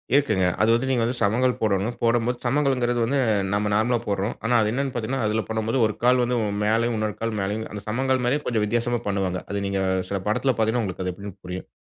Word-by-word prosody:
இருக்குங்க. 110 -10 +3 0.2
அது 110 - +4
வந்து 120 +3 +1
நீங்க 125 -3 +2
வந்து, 120 +2 -1
சமணங்கால் 125 +5 +2
போடனும். 110 +2 0
போடும்போது 120 +1 +2
சமணங்கால்ன்றது 125 -2 +1
வந்து 140 +4 0 0.3
நம்ம 105 0 +1
நார்மலா 115 +4 +2
போட்றோம். 100 +1 -1
ஆனா, 120 - +1
அது 105 - +1
என்னன்னு 135 +2 -2
பாத்தீங்கன்னா, 120 +1 -2
அதுல 110 +1 +1
பண்ணும்போது 110 +2 -1
ஒரு 110 - -4
கால் 125 +1 +5
வந்து 125 +1 0 0.3
மேலேயும், 115 +2 +1
இன்னொரு 110 -1 -2
கால் 115 0 -2
மேலயும். 105 +3 -2
அந்த 105 - -5
சமணங்கால் 130 +3 +1
மாரியும், 145 +4 +1
கொஞ்சம் 110 -3 0
வித்தியாசமா 120 +2 0
பண்ணுவாங்க. 95 -2 -1
அது 100 - -2
நீங்க 100 0 -1 0.3
சில 100 - -1
படத்துல 130 +5 +2
பாத்தீங்கன்னா 110 +2 +2
உங்களுக்கு 95 -2 -4
அது 90 - -1
எப்டினு 100 +2 -8
புரியும். 90 +1 -6
115 Hz, 210 wpm, -24 LUFS, 105-125 Hz, 0.3 s, கால்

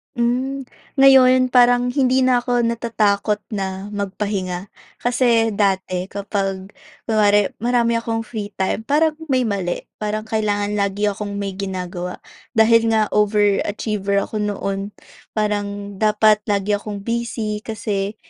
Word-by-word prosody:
Hmm. 255 +3 -1 0.3
Ngayon, 255 -2 +6
parang 245 0 +4
hindi 260 -1 +2
na 255 -1 +4
ako 245 0 0
natatakot 220 -3 0
na 195 0 -4
magpahinga. 200 -2 -3 0.2
Kasi, 240 -2 +2
dati 190 -3 0
kapag 195 -1 -3 0.3
kunwari 205 -2 +3
marami 235 0 +1
akong 225 -1 -3
free 215 -3 -5
time, 190 +2 -1
parang 310 +2 +3 0.2
may 260 -3 +2
mali, 195 -6 -2 0.2
parang 215 0 -2
kailangan 210 -2 -1
lagi 200 +1 0
akong 205 0 -5
may 200 -1 -3
ginagawa. 185 -2 -5 0.3
Dahil 230 +1 +5
nga 215 -1 +1
over 210 -1 +3
achiever 200 -1 -1
ako 215 - -5
noon, 200 -1 -3 0.4
parang 205 -1 -2
dapat 215 0 +4
lagi 205 0 0
akong 205 -1 -7
busy. 230 -2 -2
Kasi, 210 -2 -3
210 Hz, 125 wpm, -20 LUFS, 200-235 Hz, 0.4 s, Ngayon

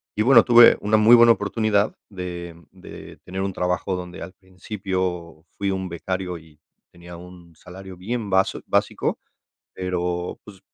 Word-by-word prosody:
y 105 - +1
bueno, 120 -1 +6
tuve 120 -1 +7
una 110 +1 +2
muy 110 +3 +7
buena 120 0 +7
oportunidad 105 0 -1
de 90 -3 -7 0.2
de - - -13
tener 95 +1 -5
un 95 0 -3
trabajo 90 +1 -2
donde 90 0 -8
al 95 - -10
principio 95 -4 -5
fui 100 -1 -1
un 95 -1 -3
becario 90 +1 -4
y 80 -2 -21 0.3
tenía 85 0 -13
un 90 -1 -15
salario 95 +2 -12
bien 110 +3 -4
bas 95 0 +2
bien - - -10
básico, - - -1 0.6
pero, 90 -1 -4
pues, 100 -3 -14
95 Hz, 155 wpm, -22 LUFS, 90-105 Hz, 0.6 s, tuve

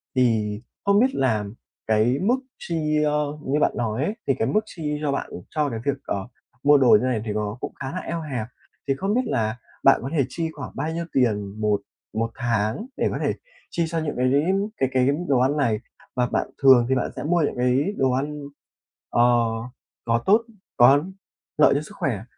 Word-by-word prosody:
Thì 110 -4 +1 0.2
không 200 0 +4
biết 260 +3 +2
là 110 -6 +1 0.4
cái 110 +5 +2
mức 225 +7 +3 0.2
chi, 155 -2 0
ơ, 150 0 0
như 140 +3 +1
bạn - - +3
nói 115 +3 -1
ấy, 210 +7 -1
thì 135 - +4
cái 110 - +1
mức 215 - +3
chi 150 -6 -4
cho 145 - 0
bạn, 140 - -3 0.2
cho 150 -2 0
cái 115 -3 -4
việc, 140 -1 0
ờ, 95 -1 -3 0.4
mua 145 0 +7
đồ 130 -3 +4
như 125 - -1
này 120 -4 0
thì 105 - -2
nó 105 +1 -2
cũng - - -5
khá 130 - -5
là 185 - -5
eo 170 -2 -4
hẹp. 130 -8 -4 0.4
Thì 135 - +2
không 195 +8 -1
biết 250 - +3
là 110 0 -1 0.3
bạn 135 - +6
có 135 - -3
thể 140 - +3
chi 165 +3 -3
khoảng - - -7
bao 150 +4 -2
nhiêu 170 0 -3
tiền 105 -5 0
một 105 -1 +1 0.3
một 115 +1 -1
tháng 115 - -1
để - - +1
có - - -2
thể - - +1 0.4
chi 170 - 0
cho 165 0 -2
những 155 -2 -3
cái 130 +1 +2 0.5
cái 130 - +1
cái 130 0 +3 0.2
đồ 135 -3 +3
ăn 135 +4 +2
này? 115 -7 +1 0.4
Và 125 - +2
bạn - - -1
thường 130 -3 +7
thì 130 - +3
bạn 125 - -1
sẽ - - -5
mua 170 +3 +2
những 145 - 0
cái 130 +10 +1
đồ 130 -1 +2
ăn, 145 +3 -2 0.7
ờ, 120 - +2 0.8
có 115 0 +1
tốt 210 +4 +5 0.4
có 135 +4 +6 0.5
lợi 150 - +6
cho 145 - +1
sức 155 - -12
khỏe 110 -7 -1
135 Hz, 210 wpm, -24 LUFS, 115-150 Hz, 0.8 s, mua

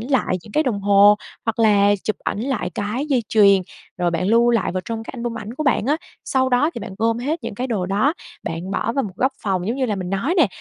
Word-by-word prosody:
lại 245 -6 0
những 210 - -14
cái 305 - +3
đồng 230 -8 -1
hồ 200 +1 +6 0.3
hoặc 225 0 -2
là 205 -2 +4
chụp 215 - -1
ảnh 205 - -2
lại 245 -7 -2
cái 215 +8 -2
dây 265 -5 +1
chuyền, 200 -3 +5 0.4
rồi 175 -1 +1
bạn 170 +2 -1
lưu 235 +2 +4
lại 230 -6 +1
vào 185 - -1
trong 225 -1 -4
cái - - -9
album 235 -1 -4
ảnh 215 +2 -7
của 310 - -3
bạn 255 -4 +2
á. 295 - +2 0.3
Sau 260 -1 +1
đó 255 +5 +2
thì - - -5
bạn 200 -2 -7
gom 230 +1 +1
hết 290 +7 -2
những - - -5
cái 250 +5 -3
đồ 205 -8 -2
đó, 210 - +2 0.3
bạn 165 +3 -5
bỏ 220 +3 -1
vào 275 +2 0
một 190 -3 -8
góc 260 +6 +1
phòng 185 -3 -1
giống 230 +4 -1
như 260 -2 0
là 210 - -1
mình 185 -1 -4
nói 230 - 0
nè. 330 - +5
225 Hz, 265 wpm, -21 LUFS, 200-255 Hz, 0.4 s, hồ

